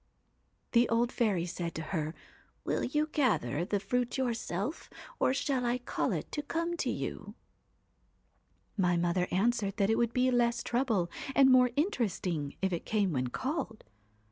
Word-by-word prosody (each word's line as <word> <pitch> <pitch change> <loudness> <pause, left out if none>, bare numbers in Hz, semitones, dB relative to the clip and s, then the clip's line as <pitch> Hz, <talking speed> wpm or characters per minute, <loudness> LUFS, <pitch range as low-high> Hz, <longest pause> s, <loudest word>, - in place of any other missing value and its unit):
'The 240 0 +4
old 235 +1 +2
fairy 205 -8 +1
said 175 -1 -4
to 160 - -3
her: 155 -1 -2 0.5
"Will - - -1
you 300 +4 +1
gather 175 - +1
the 200 +3 0
fruit 245 +6 -1
yourself, 235 - -2 0.3
or - - +3
shall 270 -1 0
I 240 0 +1
call 245 - -2
it - - -3
to 295 - -2
come 335 +3 -2
to - - -1
you? - - -4 0.5
" - - -42
' - - -43 0.3
My 180 -3 +2
mother 175 +1 +1
answered 205 0 +1
that 200 0 +2
it 225 - +2
would 235 -1 +2
be 255 +1 +2
less 240 -1 +2
trouble 225 -9 0 0.2
and 270 -1 +7
more 250 -1 +6
interesting 195 - -1
if 190 -1 +1
it 170 - -2
came 205 -5 +1
when 130 -2 0
called. 255 - -3
230 Hz, 170 wpm, -31 LUFS, 180-255 Hz, 0.5 s, and